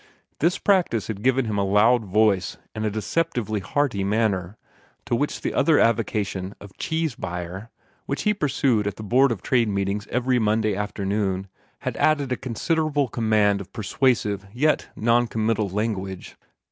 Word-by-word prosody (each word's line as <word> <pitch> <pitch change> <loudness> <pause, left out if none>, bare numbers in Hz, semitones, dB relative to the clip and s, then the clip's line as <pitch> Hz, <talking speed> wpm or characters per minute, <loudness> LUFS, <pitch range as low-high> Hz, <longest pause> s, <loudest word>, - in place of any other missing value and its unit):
This 170 +5 +2
practice 180 - +2
had 105 -2 -4
given 130 +2 +2
him 105 -2 -1
a - - +2
loud 110 +4 +4
voice 100 -2 +2 0.2
and 110 - -4
a 110 - +1
deceptively 110 - -1
hearty 110 0 -1
manner, 100 -2 0 0.5
to - - -3
which 145 +5 -2
the - - -2
other 160 -3 +4
avocation 105 -4 0
of 100 -1 -13
cheese 160 -3 -1
buyer, 90 +2 -6 0.4
which 140 - -2
he 210 - +3
pursued 135 - +1
at 100 - -3
the 110 - -8
Board 125 +5 +4
of 110 - -4
Trade 120 -4 +2
meetings 100 +1 -2
every 125 0 +1
Monday 110 -1 +1
afternoon, 100 -1 -2 0.3
had - - -3
added 145 -4 +2
a - - +2
considerable 145 +3 -1
command 105 -4 +2
of 95 - -11
persuasive 110 -3 0
yet 150 +7 +1
non 120 +2 +2
committal 110 -2 0
language. 95 -2 -3
110 Hz, 160 wpm, -24 LUFS, 100-130 Hz, 0.5 s, loud